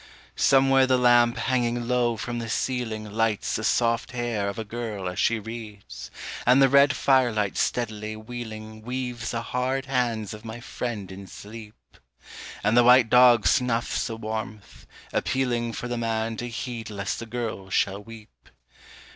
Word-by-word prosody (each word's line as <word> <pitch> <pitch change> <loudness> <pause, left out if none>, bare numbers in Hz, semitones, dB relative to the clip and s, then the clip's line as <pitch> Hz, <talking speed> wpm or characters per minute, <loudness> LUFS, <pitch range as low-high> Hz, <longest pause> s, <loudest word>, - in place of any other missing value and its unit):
_) - - -21 0.4
Somewhere 135 -1 +5
the 130 0 +3
lamp 120 -1 +4
hanging 120 -2 0
low 120 -2 +1
from 120 +1 -4
the 115 -1 -5
ceiling 115 -2 -2
Lights 110 -1 0
the 110 - -3
soft 115 +2 +1
hair 120 -5 -1
of 100 - -6
a 110 - -3
girl 110 -3 -5
as 90 - -4
she 115 - +2
reads, 105 - -9 0.3
And 125 +2 +5
the 135 -1 +6
red 140 0 +5
firelight 120 -8 +2
steadily 110 -2 -2
wheeling 110 -1 -8
Weaves 125 -1 -4
the 115 -1 -3
hard 130 +2 -1
hands 120 -6 -1
of 105 0 -10
my 115 +1 -7
friend 115 -5 -5
in 95 +1 -9
sleep. 105 - -12 0.6
And 105 +2 +2
the 120 - +6
white 125 -1 +6
dog 125 -3 +6
snuffs 120 -2 +1
the 115 -1 -5
warmth, 110 - -6 0.3
appealing 120 -3 0
For 120 - -5
the 120 -1 -3
man 115 0 -1
to 120 +2 -4
heed 115 -1 -5
lest 100 -2 -3
the 115 - -7
girl 110 -5 -4
shall 100 +1 0
weep. 105 - -14
115 Hz, 165 wpm, -25 LUFS, 110-125 Hz, 0.6 s, the